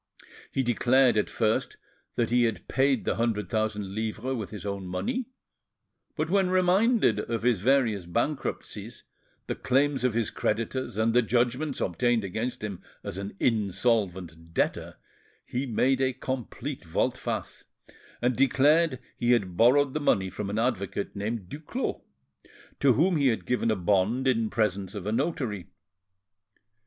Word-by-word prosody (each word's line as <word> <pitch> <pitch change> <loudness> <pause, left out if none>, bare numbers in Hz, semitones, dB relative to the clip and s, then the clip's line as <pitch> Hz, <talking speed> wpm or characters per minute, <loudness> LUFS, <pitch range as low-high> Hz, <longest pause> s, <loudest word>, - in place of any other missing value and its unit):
He 135 - 0
declared 125 +1 +3
at 105 - +1
first 110 -1 0 0.4
that 120 -1 0
he 120 0 +4
had 115 -2 -3
paid 135 -2 +2
the - - 0
hundred 110 -5 -1
thousand 105 -3 -1
livres 110 +4 -2
with 110 -5 -4
his 105 -1 -8
own 100 -2 -4
money 240 - -2 0.9
but 155 -1 -1
when 190 +1 +2
reminded 185 - +3
of 115 +1 -3
his 120 -6 +2
various 115 -7 +2
bankruptcies, 145 - -3 0.4
the - - -2
claims 140 0 +1
of 125 -3 +1
his 115 -2 0
creditors, 115 +1 -2
and 110 +1 +2
the 125 - +5
judgments 125 +5 0
obtained 115 +5 +1
against 110 +5 -3
him 100 -4 -5 0.2
as 95 - -5
an 100 0 -6
insolvent 95 -7 0
debtor, - - -1 0.5
he 130 +3 -3
made 130 +3 +2
a 130 -1 +2
complete 130 +1 -5
volte 80 -2 0
face, - - -4 0.6
and 125 0 +2
declared 140 +3 +4 0.2
he 120 0 +3
had 95 -7 0
borrowed 130 +6 +4
the 155 - -1
money 95 -10 +1
from 100 +1 -4
an 105 - -2
advocate 110 -5 -1
named 105 -1 -3
Duclos, 155 - -4 0.8
to 135 -2 +5
whom 170 +6 +3
he 140 -2 +3
had 115 -3 0
given 125 -2 0
a 110 - +2
bond 100 +7 +1
in 115 -4 +2
presence 100 -3 -1
of 100 -2 -5
a 105 - -1
notary. 120 - -2
115 Hz, 150 wpm, -27 LUFS, 105-135 Hz, 0.9 s, the